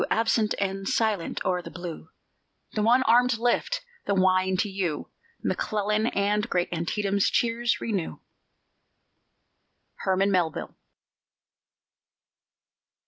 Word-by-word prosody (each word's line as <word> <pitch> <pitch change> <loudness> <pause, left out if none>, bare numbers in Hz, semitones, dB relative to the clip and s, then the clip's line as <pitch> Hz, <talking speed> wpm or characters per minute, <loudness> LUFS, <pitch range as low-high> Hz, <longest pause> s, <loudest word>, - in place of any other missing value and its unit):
Absent 225 -1 +2
and 195 0 -2
silent 215 -6 0
o'er 180 -1 +1
the - - -9
blue; 175 -2 -8 0.6
The 215 - 0
one 240 +4 +4
armed 245 0 +4
lift 245 - 0 0.3
the 200 - +2
wine 185 0 +3
to 205 - +1
you, 190 -6 -3 0.3
McClellan, 210 +1 0
And 205 0 0
great 175 -1 0
Antietam's 200 +4 0
cheers 235 0 +1
renew. 200 -7 -2 1.8
HERMAN 195 +1 +1
MELVILLE. 175 -5 -1
200 Hz, 100 wpm, -26 LUFS, 185-225 Hz, 1.8 s, one